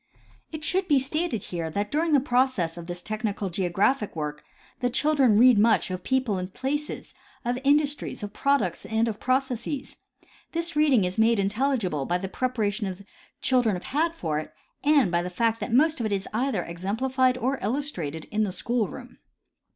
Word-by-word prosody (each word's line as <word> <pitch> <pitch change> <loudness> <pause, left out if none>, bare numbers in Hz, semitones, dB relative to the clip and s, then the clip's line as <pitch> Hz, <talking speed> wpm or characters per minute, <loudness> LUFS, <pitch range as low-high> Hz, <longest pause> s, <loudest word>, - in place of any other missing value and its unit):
It 315 -1 -6
should 370 +3 +1
be 290 - +4
stated 270 - -1
here 170 -2 -4
that 205 +5 -3
during 315 +2 +1
the 285 - +6
progress 250 -10 +1
of 170 -1 -8
this 175 0 -6
tech 215 0 -4
nical 205 -4 -2
geographic 195 +6 0
work 150 -1 -4 0.4
the 245 - +1
children 265 -4 +3
read 245 -1 +7
much 220 -3 +3
of 185 -1 -4
people 260 -7 0
and 180 - -3
of 190 - -26
places, 295 +3 -3 0.3
of 245 +1 0
industries, 290 -3 +1
of 205 0 -5
products 280 +3 +1
and 225 +1 0
of 215 -2 -3
processes. 260 +1 -2 0.6
This 335 -1 -2
reading 290 -8 +4
is 180 +4 -2
made 225 +1 +4
intelligible 200 - 0
by 175 - +1
the 190 +1 -4
preparation 215 -3 -1
the 190 +2 -11 0.4
children 245 -6 +2
have 180 - -6
had 325 +4 0
for 155 - -2
it 155 - -7 0.3
and 285 - +4
by 170 0 +2
the 180 - -4
fact 225 +5 0
that - - -4
most 305 +6 +3
of 230 - 0
it - - -5
is 195 -1 -1
either 240 -5 0
exemplified 250 +9 0
or 260 +2 -1
illustrated 195 - -3
in 215 - 0
the 205 -3 +1
school 225 +4 -1
room. - - -11
230 Hz, 190 wpm, -26 LUFS, 190-270 Hz, 0.6 s, read